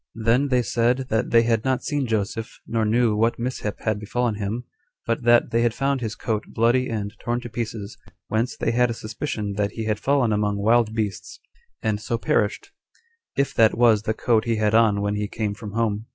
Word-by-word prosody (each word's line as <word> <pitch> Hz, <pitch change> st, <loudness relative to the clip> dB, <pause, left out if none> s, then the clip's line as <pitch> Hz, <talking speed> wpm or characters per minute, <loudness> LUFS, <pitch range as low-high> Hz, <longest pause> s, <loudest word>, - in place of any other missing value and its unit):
Then 115 Hz, +5 st, +2 dB
they 125 Hz, -2 st, +2 dB
said 120 Hz, +4 st, 0 dB
that 110 Hz, +2 st, 0 dB
they 115 Hz, 0 st, +5 dB
had 115 Hz, -1 st, +1 dB
not 130 Hz, -1 st, 0 dB
seen 145 Hz, -3 st, -1 dB
Joseph, 110 Hz, 0 st, -3 dB
nor 115 Hz, -1 st, 0 dB
knew 115 Hz, 0 st, +2 dB
what 115 Hz, +2 st, +1 dB
mishap 115 Hz, -3 st, -4 dB
had 110 Hz, -2 st, -1 dB
befallen 120 Hz, +2 st, -1 dB
him; 105 Hz, +3 st, -3 dB, 0.4 s
but 115 Hz, +1 st, -1 dB
that 120 Hz, 0 st, +4 dB
they 115 Hz, 0 st, +2 dB
had 120 Hz, -1 st, +1 dB
found 135 Hz, -1 st, 0 dB
his 110 Hz, -2 st, -3 dB
coat 110 Hz, -3 st, -2 dB
bloody 120 Hz, +3 st, +2 dB
and 105 Hz, -2 st, -3 dB
torn 120 Hz, +1 st, -1 dB
to 120 Hz, -, -7 dB
pieces, 110 Hz, -3 st, -5 dB, 0.3 s
whence 115 Hz, +3 st, -1 dB
they -, -, 0 dB
had 125 Hz, +1 st, +2 dB
a 115 Hz, -, -3 dB
suspicion 110 Hz, -2 st, -4 dB
that 105 Hz, -1 st, 0 dB
he 115 Hz, -, -4 dB
had 110 Hz, -1 st, -1 dB
fallen 135 Hz, -5 st, +2 dB
among 105 Hz, -1 st, 0 dB
wild 110 Hz, +2 st, +2 dB
beasts, 105 Hz, -4 st, -3 dB, 0.4 s
and 110 Hz, -1 st, 0 dB
so 115 Hz, -, -2 dB
perished, 105 Hz, -2 st, 0 dB, 0.6 s
if 140 Hz, 0 st, 0 dB
that 110 Hz, -1 st, +4 dB
was 115 Hz, -3 st, +5 dB
the 110 Hz, 0 st, -2 dB
coat 115 Hz, -1 st, +1 dB
he 115 Hz, -1 st, +1 dB
had 105 Hz, -1 st, +1 dB
on 110 Hz, -3 st, +4 dB
when 100 Hz, 0 st, 0 dB
he 105 Hz, 0 st, -2 dB
came 105 Hz, -1 st, -3 dB
from 105 Hz, -1 st, -8 dB
home. 110 Hz, -1 st, -1 dB
115 Hz, 210 wpm, -23 LUFS, 105-120 Hz, 0.6 s, they